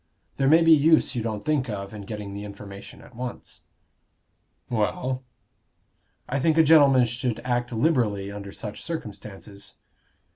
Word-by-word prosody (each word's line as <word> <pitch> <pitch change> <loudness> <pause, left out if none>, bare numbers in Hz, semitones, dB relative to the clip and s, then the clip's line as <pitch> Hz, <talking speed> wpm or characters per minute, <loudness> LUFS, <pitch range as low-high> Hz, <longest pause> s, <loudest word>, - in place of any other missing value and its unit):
There 135 - +2
may 160 +4 +6
be 165 - +5
use 160 0 +5
you 120 - -2
don't 110 -2 -4
think 145 -5 0
of 100 -1 -5
in 105 -2 -8
getting 105 -2 -6
the 100 +1 -6
information 100 -1 -10
at 125 - -17
once." 125 +1 -7 1.1
"Well?" 125 +3 -1 1.1
"I 140 - -1
think 160 +3 +2
a 160 - +7
gentleman 140 -5 +6
should 120 0 -3
act 120 0 -1
liberally 110 -7 0
under 100 -1 -8
such 105 0 -8
circumstances." 105 -9 -8
120 Hz, 145 wpm, -25 LUFS, 105-140 Hz, 1.1 s, a